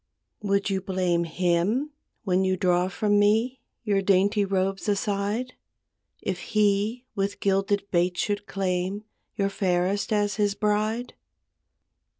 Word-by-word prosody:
Would 200 -1 0
you 190 -1 0
blame 185 -3 0
him, 180 - 0 0.3
when 190 -2 +2
you 185 0 +1
draw 180 0 +2
from 205 +2 +1
me 225 +5 +2 0.2
Your 200 -3 +1
dainty 200 +2 +3
robes 195 +1 -1
aside, 205 +4 -1 0.7
If 185 -2 -2
he 215 +4 +1
with 200 0 -2
gilded 200 +1 +1
baits 175 0 +1
should 205 0 -1
claim 190 +1 -2 0.3
Your 195 -1 0
fairest 190 +2 0
as 205 -1 +1
his 205 -1 +1
bride? 215 +3 0
200 Hz, 125 wpm, -26 LUFS, 185-210 Hz, 0.7 s, dainty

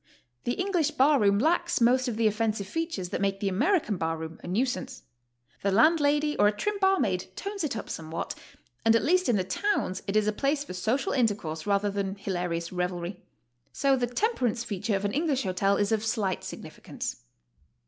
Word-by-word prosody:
The 240 - +1
English 360 -4 +1
bar 290 -1 +4
room 200 -2 +4
lacks 340 +7 +2
most 250 +2 +4
of 230 -3 -2
the 230 - +1
offensive 215 -1 +1
features 265 - -3
that - - -3
make 195 -1 0
the 200 - 0
American 260 - +1
bar 165 -1 -1
room 160 0 -7
a - - -7
nuisance. 255 +6 -2 0.6
The 200 - +1
landlady 295 - +3
or 205 - +5
a - - +4
trim 405 - -2
barmaid 270 - +2
tones 400 - -4
it 275 -7 -2
up 210 - -6
somewhat, 160 +1 -4 0.5
and 225 0 +5
at 230 - +3
least 365 +2 +3
in 240 - +4
the 190 - +1
towns 190 - -1
it 195 - -2
is 215 -1 +3
a 215 - +2
place 280 +5 0
for 235 - -8
social 220 +9 0
intercourse 200 - -1
rather 200 0 +2
than 195 -1 -2
hilarious 175 -4 -3
revelry. 180 0 -3 0.5
So 275 -1 +3
the 245 -2 0
"temperance" 245 - 0
feature 210 -1 -2
of 195 +1 -2
an 205 - 0
Englis/h 290 -3 +1
hotel 195 +1 +1
is 205 0 +1
of 220 -1 +1
slight 215 -4 -1
significance. - - -6
220 Hz, 190 wpm, -28 LUFS, 195-280 Hz, 0.6 s, or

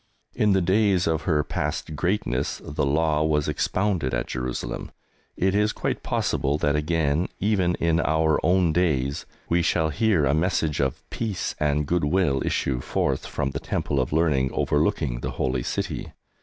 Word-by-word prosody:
In 105 -2 +2
the 95 - +3
days 95 0 +3
of 80 -1 -1
her 75 -2 +3
past 75 - -3
greatness 90 +8 -1
the 70 - -1
law 75 +1 +2
was 75 -1 +1
expounded 95 -9 0
at - - -1
Jerusalem. 65 -1 -4 0.5
It 95 +1 +2
is 105 +1 +2
quite - - -2
possible 70 +2 0
that 75 -1 +1
again, 75 +1 +1
even 95 -4 +1
in 85 0 +1
our 80 -1 +2
own 90 -1 +3
days, 70 -6 0 0.2
we 85 +1 +2
shall 80 -1 +1
hear 85 0 +2
a 70 - +2
message 80 -2 0
of 65 -2 -2
peace 105 -6 -3
and 75 0 +1
goodwill 80 -3 +1
issue 65 -2 -1
forth - - -1
from 70 0 -2
the - - -4
Temple 70 - -1
of 65 - -1
Learning 75 -4 +2
overlooking - - 0
the - - -4
Holy 65 -1 0
City. - - -4
80 Hz, 160 wpm, -25 LUFS, 70-90 Hz, 0.5 s, the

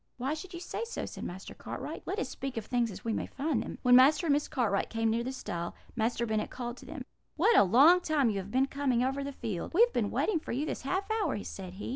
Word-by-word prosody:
"'Why 260 +4 -1
should 355 +3 -7
you - - -5
say 360 - -4
so?' 465 - -4
said - - -8
Master 185 +2 -7
Cartwright. - - -6
'Let - - -2
us - - -1
speak 270 -2 -6
of 220 - -3
things 240 -2 +1
as 200 - -9
we 225 - 0
may - - -2
find 280 -3 -1
them.' - - -6
"When 250 -1 +7
Master 290 +7 +6
and 300 - +4
Miss 290 +1 +1
Cartwright 225 -8 0
came 225 -1 0
near 230 +1 0
the 255 - -3
stile, 170 -9 -5 0.2
Master 235 +1 0
Bennet 220 -1 -1
called 240 -1 -5
to - - -13
them: 295 -5 -7 0.3
"'What 400 +9 +4
a - - +8
long 280 - +6
time 290 -8 +2
you 200 - -2
have 190 +1 -7
been 260 +5 +3
coming 275 -3 0
over 270 +2 -1
the 280 - -4
field! 220 - -5
We 415 - +5
have 480 0 +5
been 210 -4 +1
waiting 315 - +1
for - - -6
you 280 +5 -1
this - - -4
half 375 +9 -1
hour,' 430 - 0
said 185 -2 -7
he. 195 - -6
255 Hz, 270 wpm, -30 LUFS, 225-300 Hz, 0.3 s, a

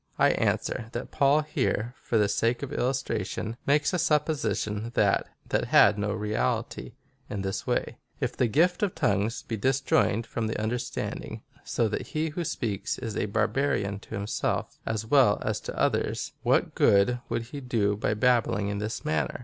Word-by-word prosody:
I - - +5
answer, 115 - -1
that 120 - -5
Paul 140 +2 +4
here, 130 -6 -1
for 115 - 0
the 105 -1 +4
sake 115 +5 0
of 140 - -5
illustration, 115 -4 -2
makes 150 +5 +3
a 180 - +1
supposition, 115 - 0
that 100 -2 +3 0.4
had 105 +1 +5
no 105 0 0
reality, 105 -11 -2 0.4
in 100 -2 -3
this 95 0 -3
way: - - -1
" - - -39
If - - -2
the 125 - +2
gift 170 +10 +2
of 205 -3 0
tongues 105 +4 0
be 115 - -4
disjoined 115 -3 +2
from 115 0 -3
the 110 - -3
understanding, 120 +3 -3 0.2
so 115 - 0
that 105 - -3
he 160 +1 +1
who 170 +3 -3
speaks 105 - -2
is 115 -4 -5
a - - 0
barbarian 105 -1 0
to - - -8
himself, 100 +1 -2
as 110 -1 -1
well 125 -4 +5
as - - -1
to - - -6
others, - - 0
what - - +2
good 100 +5 +4
would 115 - -1
he 145 - -5
do 110 -5 +1
by 105 +1 -1
babbling 115 -3 +2
in 100 0 -2
this 110 +1 -4
manner?" 75 -1 -1
115 Hz, 175 wpm, -27 LUFS, 105-130 Hz, 0.4 s, I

